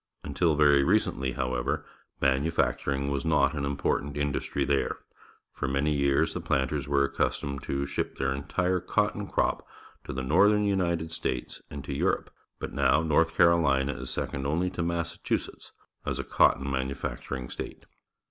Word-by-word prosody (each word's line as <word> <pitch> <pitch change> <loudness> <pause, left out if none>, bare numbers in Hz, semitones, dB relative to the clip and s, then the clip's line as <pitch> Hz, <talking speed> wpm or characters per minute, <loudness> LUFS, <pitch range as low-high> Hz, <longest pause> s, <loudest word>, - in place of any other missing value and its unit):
Until 80 +3 +1
very 70 -2 +5
recently, 65 -1 +1
however, 60 -1 -1 0.3
manufacturing 70 0 +1
was 70 -1 -1
not 75 -3 +3
an 70 -2 -2
important 70 +1 -1
industry 70 -1 -1
there. 70 -1 0 0.6
For - - -3
many 70 +3 +1
years 70 -1 +2
the - - -4
planters 65 -1 0
were 70 -1 +3
accustomed 70 0 -1
to 70 0 -1
ship 70 - -3
their 65 0 0
entire 90 +7 0
cotton 105 +2 0
crop - - 0 0.4
to - - -5
the 65 0 -3
northern 105 +10 +4
United 85 -5 0
States 60 -6 -3
and 70 -1 -7
to 70 - -5
Europe, 70 - 0 0.2
but - - -6
now 80 - +3
North 80 +1 +2
Carolina 75 -5 +4
is - - -7
second 70 0 -3
only 85 +5 0
to 85 - -4
Massachusetts 85 0 -3 0.3
as - - -2
a - - -2
cotton 65 +1 +3
manufacturing 65 -1 -3
state. - - -7
70 Hz, 150 wpm, -28 LUFS, 70-80 Hz, 0.6 s, very